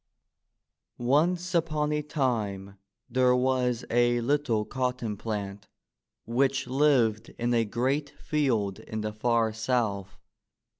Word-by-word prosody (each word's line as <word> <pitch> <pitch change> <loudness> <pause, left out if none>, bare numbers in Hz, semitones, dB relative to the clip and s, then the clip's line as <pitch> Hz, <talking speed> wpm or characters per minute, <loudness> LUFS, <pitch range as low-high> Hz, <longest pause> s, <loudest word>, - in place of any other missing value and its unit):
Once 170 +9 +1
upon 155 -3 +1
a 150 0 0
time, 110 -10 -2 0.3
there 125 0 +3
was 125 -1 +1
a 120 0 +3
little 120 -4 +1
cotton 125 -4 -2
plant 100 -2 -5 0.6
which 135 +3 +1
lived 125 -5 +2
in 120 +1 0
a 115 -1 +3
great 130 +6 -1
field 130 -9 -1
in 110 0 -5
the 105 0 -3
far 115 0 +1
South. 110 -4 -1
120 Hz, 110 wpm, -28 LUFS, 110-140 Hz, 0.6 s, there